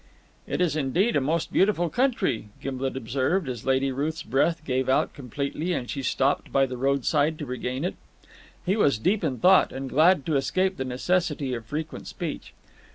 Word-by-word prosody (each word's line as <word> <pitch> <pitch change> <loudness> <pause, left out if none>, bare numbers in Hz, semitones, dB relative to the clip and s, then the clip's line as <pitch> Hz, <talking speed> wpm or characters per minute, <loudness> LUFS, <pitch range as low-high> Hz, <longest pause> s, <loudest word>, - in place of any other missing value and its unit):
"It - - -2
is 170 -4 +2
indeed 165 - +1
a - - +3
most 155 +4 -1
beautiful 190 -3 +3
country," 195 - 0
Gimblet 130 0 -3
observed, 135 - 0
as 125 -1 -5
Lady 135 +1 +2
Ruth's 150 +5 -2
breath 155 +4 +1
gave 130 0 0
out 130 - +2
completely, 140 +6 -3
and 125 -7 -3
she 135 - -4
stopped 135 +2 0
by 135 0 +4
the 130 -1 -5
roadside 140 +4 +1
to 150 - -5
regain 125 +3 -3
it. 180 - -1 0.7
He 190 +2 +2
was 145 - +3
deep 195 - +1
in 135 -6 -1
thought, 185 +5 +5
and 135 0 -5
glad 160 0 +4
to 155 -3 +1
escape 185 +7 0
the 130 - -2
necessity 145 +1 0
of 115 -2 -5
frequent 155 +5 -5
speech. - - -6
140 Hz, 180 wpm, -26 LUFS, 130-170 Hz, 0.7 s, thought